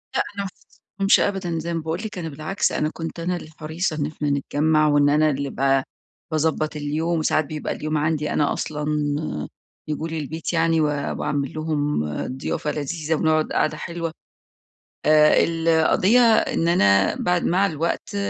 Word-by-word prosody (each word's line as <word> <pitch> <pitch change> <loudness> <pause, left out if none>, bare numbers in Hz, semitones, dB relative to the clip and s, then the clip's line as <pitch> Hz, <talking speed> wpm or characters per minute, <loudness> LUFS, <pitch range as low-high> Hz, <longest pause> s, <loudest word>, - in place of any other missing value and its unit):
لأ، - - +3
أنا 200 - -2
ما 195 - -4 0.5
خاصمتهمش 195 +1 +5
أبدًا. 185 -5 -1
زي 170 +1 -4
ما 165 - -1
باقول 160 +3 -3
لِك، 210 - -6
أنا 165 -2 -4
بالعكس، 155 +6 -1
أنا 150 - 0
كنت 165 +1 -6
أنا 175 +2 -1
اللي 160 -2 -8
حريصة 160 +2 -2
إن 145 -2 -1
إحنا 150 -1 -3
نتجمّع، 155 +2 +2
وإن 145 -1 +4
أنا 155 +1 +4
اللي 140 -1 -2
ب 135 0 +1 0.5
باضبّط 155 0 0
اليوم. 155 +3 -1
وساعات 155 0 +1
بيبقى 155 +1 -4
اليوم 155 0 -2
عندي 150 0 0
أنا 145 - +1
أصلًا 150 -1 -4 1.0
ييجوا 155 +1 -3
لي 160 -1 -4
البيت 160 +4 -4
يعني 165 -1 +2
و 155 - +3
واعمل 140 -1 -2
لهم 150 - -1 0.3
ضيافة 150 +2 -2
لذيذة، 155 +2 -2
ونقعد 155 0 +1
قعدة 155 - +1
حلوة. 170 -1 -4 0.9
آآ 150 0 +5
القضية 165 +7 +3 0.2
إن 165 - +1
أنا 100 - +4
بعد 180 -1 0
مع 190 +3 +3
الوقت 165 +4 -3
155 Hz, 165 wpm, -23 LUFS, 150-165 Hz, 1.0 s, خاصمتهمش